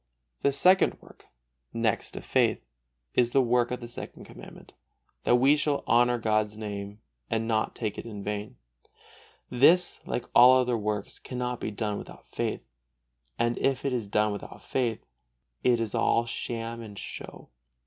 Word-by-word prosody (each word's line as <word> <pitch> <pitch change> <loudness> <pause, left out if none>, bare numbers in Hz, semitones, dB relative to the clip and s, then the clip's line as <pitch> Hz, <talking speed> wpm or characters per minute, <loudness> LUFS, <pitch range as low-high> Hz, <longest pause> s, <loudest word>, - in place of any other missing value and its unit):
The 140 - +3
second 180 +7 +4
work, - - -19 0.5
next 115 -2 0
to - - -6
faith, - - +1 0.5
is 120 -1 +2
the 135 - +5
work 120 0 +2
of 125 0 -4
the 120 - -6
Second 120 - -9
Commandment, - - -13 0.5
that 120 - +5
we 135 +4 +5
shall 150 -1 0
honor 120 +1 +4
God's 110 -2 0
Name 100 -1 -6 0.3
and 115 0 -1
not 110 -1 0
take 110 -3 -3
it - - -7
in 105 -3 -7
vain. 105 +4 -4 1.0
This, 165 +9 +4
like 125 - -2
all 125 +2 +8
the 130 - +5
other 120 - +1
works, 105 0 -3
cannot 125 -1 -4
be - - -3
done 105 -1 -3
without - - -12
faith; - - -2 0.8
and 120 0 0
if 135 0 0
it 135 - 0
is 115 -4 -2
done 105 +1 +2
without 100 - -8
faith, 120 -4 -2 0.6
it 120 -2 +3
is 115 -2 -2
all 115 - +2
sham 115 0 -4
and 105 -3 -10
show. - - -8
115 Hz, 165 wpm, -28 LUFS, 105-125 Hz, 1.0 s, all